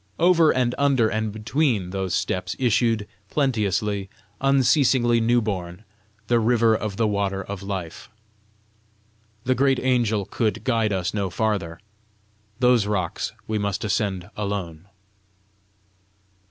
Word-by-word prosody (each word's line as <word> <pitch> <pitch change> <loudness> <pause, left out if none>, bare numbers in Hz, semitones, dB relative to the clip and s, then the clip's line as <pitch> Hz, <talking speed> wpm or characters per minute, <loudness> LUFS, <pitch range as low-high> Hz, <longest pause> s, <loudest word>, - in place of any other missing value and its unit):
Over 170 -2 +5
and 125 -1 +1
under 135 -6 +3
and 110 -1 -2
between 110 - 0
those 95 -2 -2
steps 90 +1 -2
issued, 115 -3 +1 0.2
plenteously, 105 - 0 0.3
unceasingly 130 -3 +3
new 120 +1 +2
born, 90 -2 -4 0.4
the 120 +2 +2
river 115 -1 +3
of 105 -3 -4
the 115 - +2
water 100 -1 -1
of 100 0 -7
life. 95 -3 -6 1.3
The 130 - +2
great 135 +1 +2
angel 115 -6 +1
could 110 -1 -2
guide 115 -5 +1
us 95 -2 -1
no 100 -3 -1
farther: 95 -5 -2 0.8
those 125 -4 +3
rocks 95 -5 -2 0.2
we 110 -1 -1
must 100 -1 -2
ascend 100 -4 -2
alone! 100 -5 -4
110 Hz, 120 wpm, -23 LUFS, 100-120 Hz, 1.3 s, Over